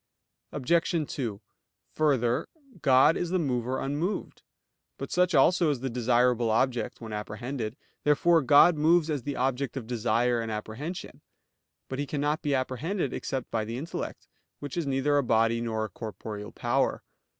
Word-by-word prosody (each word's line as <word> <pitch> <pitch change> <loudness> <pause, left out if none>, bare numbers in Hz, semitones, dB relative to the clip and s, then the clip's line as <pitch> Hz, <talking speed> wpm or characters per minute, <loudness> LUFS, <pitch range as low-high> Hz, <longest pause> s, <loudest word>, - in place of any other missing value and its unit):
Obj. 160 +2 0
2: 115 -6 -4 0.5
Further, 135 -3 +1 0.3
God 135 +4 +5
is 175 - -2
the 185 - +1
mover 130 -5 -1
unmoved. 150 +9 -3 0.6
But - - -6
such 180 -1 +2
also 170 +4 +4
is 140 -5 -1
the 135 -1 -3
desirable 120 0 +2
object 120 0 0
when 110 -2 -7
apprehended. 110 +3 -4 0.3
Therefore 165 +3 +4
God 150 +4 +6
moves 160 +1 +3
as 145 -3 -1
the 140 +3 -4
object 130 0 -1
of 125 - -5
desire 120 +1 +1
and 115 -1 -4
apprehension. 110 +11 -6 0.7
But 130 - -5
He 145 - -2
cannot 150 +2 -1
be 145 -2 0
apprehended 135 +5 -2
except 130 -2 -4
by 110 -1 0
the 115 +2 -5
intellect, 160 +6 -6 0.3
which 145 -2 -7
is 170 -4 -2
neither 140 +2 +2
a - - +1
body 115 0 +2
nor 110 -2 -1
a - - -7
corporeal 105 0 -7
power. - - 0
130 Hz, 155 wpm, -28 LUFS, 115-150 Hz, 0.7 s, God